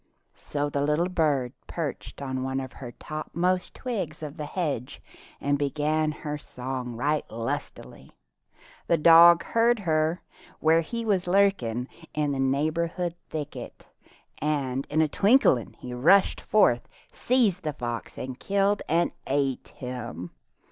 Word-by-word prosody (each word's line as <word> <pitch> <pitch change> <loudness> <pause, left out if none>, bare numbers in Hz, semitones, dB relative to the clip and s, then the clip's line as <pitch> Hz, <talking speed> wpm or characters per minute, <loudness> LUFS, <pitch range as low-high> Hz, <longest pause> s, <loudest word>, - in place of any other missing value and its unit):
So 145 0 -3
the 140 -1 -2
little 150 +5 +1
bird 145 -8 +1
perched 150 -3 -5
on 130 -1 -3
one 130 +1 -2
of 130 -1 -6
the 125 -3 -7
topmost 175 +4 -2
twigs 185 - -4
of 150 -1 -6
the 150 -3 -5
hedge 145 -8 -3 0.4
and 145 0 0
began 150 +2 0
her 150 -1 -5
song 125 -2 -5
right 145 +5 0
lustily. 115 0 -5 0.8
The 170 - +3
dog 170 +2 +8
heard 235 +1 +3
her, 160 -3 0 0.4
where 160 +1 +4
he 230 +7 -4
was 190 -4 +1
lurking 175 - +2 0.3
in 150 -2 0
a 135 - -3
neighboring 160 +6 0 0.2
thicket, 150 -2 -7 0.5
and 140 -3 -1
in 155 +2 +2
a - - +2
twinkling 200 - +3
he 125 - -8
rushed 170 +11 +4
forth, 125 - +3 0.2
seized 230 -8 +2
the 155 - -2
fox 120 -3 -5
and 130 0 -6
killed 200 +1 +1
and 170 +2 +2 0.2
ate 135 -1 0
him. 120 -9 -7
150 Hz, 135 wpm, -26 LUFS, 130-175 Hz, 0.8 s, dog